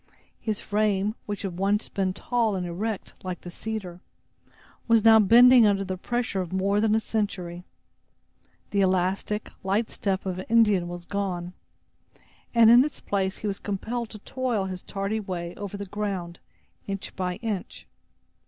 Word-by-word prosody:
His 215 -2 -2
frame, 210 -1 0
which 205 -1 -4
had 180 -3 -4
once 200 +2 +1
been 190 -2 -1
tall 225 +1 0
and 180 -1 -2
erect, 200 +5 -4
like 185 -1 -5
the 175 - -8
cedar, 190 -3 -5 0.9
was 230 -2 +4
now 220 0 +8
bending 235 +3 +7
under 200 -1 +2
the 185 -1 -3
pressure 235 0 -2
of 180 - -6
more 200 +2 +1
than 220 -1 +3
a - - +3
century. 185 -6 -3 1.1
The 200 - +2
elastic, 190 +3 0
light 200 +4 0
step 195 -2 -2
of 185 -1 -3
an 185 - -6
Indian 210 -6 +4
was 175 0 -7
gone, 180 -3 -3 1.0
and 230 -1 +8
in 240 +2 +8
its 295 -1 -4
place 190 -1 -1
he 215 - -4
was 195 -1 -3
compelled 225 +4 -3
to 215 - -8
toil 240 -2 -2
his 185 -1 -5
tardy 200 +2 -3
way 180 -4 -5
over 200 +1 -6
the 200 - -5
ground, 190 -4 -4 0.5
inch 195 -1 -5
by 180 -1 -2
inch. 215 -4 -5
200 Hz, 160 wpm, -26 LUFS, 185-220 Hz, 1.1 s, now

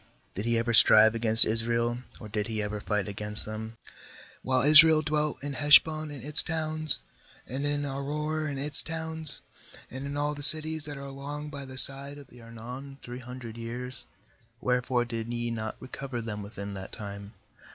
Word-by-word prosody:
did 100 - -6
he 115 0 0
ever 115 +1 -2
strive 110 0 +6
against 115 0 +5
Israel, 115 +2 -1 0.2
or 110 - -10
did 105 0 -4
he 110 -1 -5
ever 105 0 -4
fight 105 -2 -2
agair 105 +1 +2
them? 110 +1 -8 0.7
26While 130 +2 0
Israel 155 +1 +6
dwelt 150 -2 -3
in 145 0 -5
Hesh 145 +3 +6
bon 155 -1 -7
and 140 -5 -9
its 150 +2 +1
towns, 155 -1 -3 0.4
and 135 +4 -5
in 145 0 -2
Aroer 150 +3 -4
and 140 - -6
its 145 +1 +5
towns, 160 -1 -7 0.5
and 135 +2 -7
in 140 +1 -6
all 145 0 -2
the 145 - -10
cities 155 +1 +6
that 145 -1 -8
are 140 - -9
along 145 +2 -8
by 140 -1 -8
the 130 0 -11
side 140 +2 +7
of 140 -3 -15
the 125 - -17
Arnon, 125 +4 -11
three 125 +1 -9
hundred 120 -2 -10
years; 120 +2 -8 0.5
where 125 0 -1
fore 125 -1 -2
did 115 -1 -6
ye 120 0 -4
not 110 -1 -5
recover 130 -1 -8
them 110 -2 -7
within 100 0 -9
that 95 -1 -9
time? 100 0 -9
130 Hz, 185 wpm, -27 LUFS, 115-145 Hz, 0.7 s, side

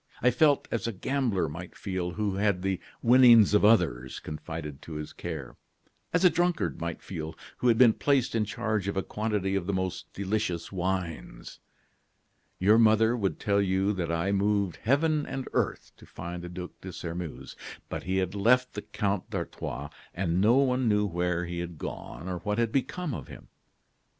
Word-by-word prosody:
I 125 - +4
felt 145 +3 +3
as 115 - -1
a - - 0
gambler 115 - 0
might 85 +4 -8
feel 95 -2 -3
who 105 -1 -1
had 100 -3 +1
the 95 -2 0 0.2
winnings 120 -4 +7
of 105 - +4
others 85 - +3
confided 75 -2 -7
to 80 - -9
his 75 0 -6
care; 80 -7 -6 0.5
as 180 +2 +2
a - - +9
drunkard 175 - 0
might 85 -1 -4
feel 80 -3 -6 0.2
who 125 - 0
had 115 -2 +5
been 120 -2 +7
placed 140 -1 +1
in 115 -1 +2
charge 105 -1 -2
of 100 - -2
a 95 - +1
quantity 105 -3 -1
of 95 -3 -1
the 100 - 0
most 95 -1 -3
delicious 100 -4 -2
wines. 90 -3 -4 1.0
"Your 105 +4 +5
mother 110 +1 +5
would 100 -5 -1
tell 100 -1 +2
you 95 +1 +1
that 85 -4 -2
I 85 +4 0
moved 100 -2 +1
heaven 150 +5 +1
and 135 -1 -4
earth - - -1
to - - -16
find 85 +1 -7
the 90 - -7
Duc 90 0 -7
de 95 - -7
Sairmeuse. 85 -1 -6 0.3
But - - -4
he 95 +1 -1
had 95 -1 0
left 125 +5 +3
the 105 - -4
Count 100 -3 -2
d'Artois, - - -5 0.2
and 90 0 0
no 110 +4 +5
one 130 -3 +2
knew 105 0 +3
where 90 -1 -1
he 85 0 -4
had 85 -2 -5
gone 80 - -7
or 90 -1 -3
what 105 +4 -2
had 115 -1 +1
become 150 +4 -1
of - - -6
him. - - -12
100 Hz, 185 wpm, -28 LUFS, 90-115 Hz, 1.0 s, a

